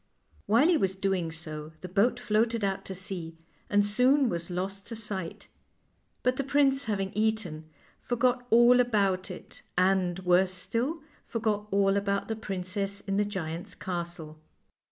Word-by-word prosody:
While 240 +8 +5
he 350 -2 +4
was 190 -8 0
doing 190 -4 -1
so 155 -1 -7
the 185 - -6
boat 205 +7 +2
floated 230 -1 +1
out 195 -1 -1
to 190 - -5
sea 175 -3 -6 0.3
and 205 0 +3
soon 250 +6 +3
was 170 -2 -3
lost 190 +2 -4
to 230 - -5
sight; 200 -6 -4 0.8
but 250 0 +2
the 275 - 0
prince, 275 0 +3
having 195 -3 -1
eaten, 210 -8 -1 0.3
forgot 245 0 0
all 240 +2 +6
about 200 -6 +2
it, 180 - -9 0.2
and, 185 -1 +2
worse 185 0 +3
still, 240 - -1 0.2
forgot 215 -3 -1
all 195 0 +3
about 200 +1 -1
the 225 - -1
princess 195 -1 -4
in 195 0 -2
the 210 - +2
giant's 175 -4 -5
castle. 170 -4 -5
200 Hz, 155 wpm, -28 LUFS, 180-230 Hz, 0.8 s, all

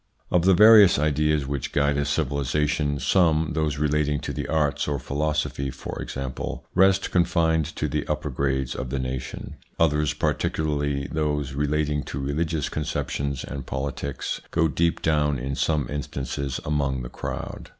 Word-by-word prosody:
Of 90 -1 +3
the 95 -1 +6
various 105 -1 +8
ideas 75 0 +1
which 70 -2 -3
guide 70 0 +2
a 70 0 0
civilisation, 70 0 0
some, 80 -3 +3
those 75 -2 0
relating 75 -1 +1
to - - -4
the - - -4
arts 75 -2 0
or 75 -1 0
philosophy 70 0 -1
for 65 +1 -6
example, 65 -1 -5
rest 95 +1 +3
confined 85 -3 +2
to 75 - -1
the 75 0 -2
upper 75 -1 -2
grades 65 0 -1
of 65 - -5
the 70 - -2
nation; 65 0 -5 0.2
others, 75 -1 +2
particularly 75 -2 -1
those 75 -3 -1
relating 75 +1 0
to 70 - -5
religious 75 +2 -1
conceptions 70 -2 -3
and 70 -3 -6
politics, 70 +1 -3
go 80 -1 +2
deep 85 +3 0
down 75 -3 +2
in 65 +3 -3
some 75 -1 0
instances 70 -1 -4
among 70 -3 0
the - - -6
crowd. - - -6
75 Hz, 150 wpm, -25 LUFS, 70-75 Hz, 0.2 s, various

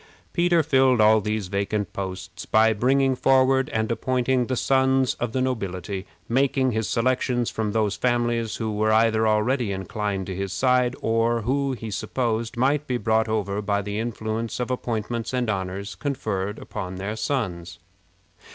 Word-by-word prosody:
Peter 175 -2 +3
filled 130 -4 +3
all 110 0 +5
these 105 -1 -2
vacant 100 +2 -2
posts 95 -1 -6
by 110 0 +4
bringing 130 +4 +2
forward 135 +1 +3
and 110 -5 -1
appointing 125 +1 0
the 130 - -1
sons 130 0 +2
of 120 -2 -2
the 130 - -1
nobility, 100 -6 -3 0.2
making 130 +1 +2
his 110 -1 -1
selections 125 0 0
from 110 -2 -2
those 105 -3 +1
families 120 -2 0
who 110 -1 -3
were 110 +1 +1
either 110 0 +3
already 110 +1 +1
inclined 95 0 -3
to 95 - -5
his 95 0 -3
side, 125 +3 +2
or 115 +1 +1
who 135 +3 0
he 115 -3 -6
supposed 115 +2 -2
might 140 +4 +1
be 125 - 0
brought 110 -1 +1
over 105 -2 -1
by 100 0 0
the 100 +1 -3
influence 115 0 -3
of 125 +1 -2
appointments 115 -1 -3
and 125 -3 0
honors 95 +1 -4
conferred 110 -8 -3
upon 95 -2 -6
their 100 +3 -4
sons. 90 -10 -3
115 Hz, 160 wpm, -24 LUFS, 105-130 Hz, 0.2 s, all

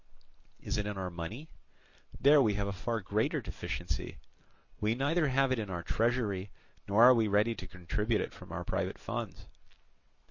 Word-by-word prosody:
Is - - -3
it 105 - -1
in 105 -1 -4
our 95 -1 -3
money? 85 - -6 0.7
There 145 +1 +7
we 105 -5 +2
have 100 0 -1
a 100 - -2
far 115 +4 -2
greater 105 +3 0
deficiency. - - -5 0.6
We 105 +2 +1
neither 150 +5 +2
have 135 0 +2
it 130 - +1
in 105 -3 -4
our 85 -2 -4
treasury, 110 -3 0 0.4
nor 105 +3 +5
are 125 +1 +10
we 115 -3 +2
ready 105 +3 +3
to 95 - -8
contribute 105 +5 -1
it - - -4
from - - -12
our - - -4
private - - -2
funds. - - -5
110 Hz, 175 wpm, -32 LUFS, 100-125 Hz, 0.7 s, are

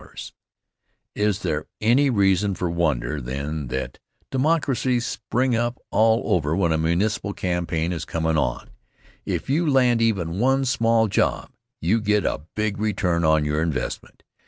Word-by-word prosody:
00 - - -17 1.0
Is 105 -1 0
there - - -2
any 125 +6 +3
reason 100 -3 +2
for 90 -2 -2
wonder, 75 -4 -1
then, 70 +4 -4
that 65 +2 -4 0.3
"Democracies" 130 -4 +1
spring 120 +3 -1
up 120 +2 -1
all 110 +1 +3
over 80 -2 0
when 85 -3 +1
a 80 - +2
municipal 100 +5 0
campaign 85 -2 -2
is 80 -3 -4
comm' 80 +1 -1
on? 60 -5 -2 0.6
If - - -2
you 155 +4 +1
land 125 -4 +3
even 95 -6 0
one 135 +3 +2
small 115 -2 +2
job, 100 - 0 0.3
you 105 +8 +1
get 105 -1 +1
a 75 - -2
big 105 -1 -1
return 95 -5 0
on 80 -1 +3
your 75 +1 0
investment. 80 -5 -4
100 Hz, 150 wpm, -23 LUFS, 80-115 Hz, 1.0 s, any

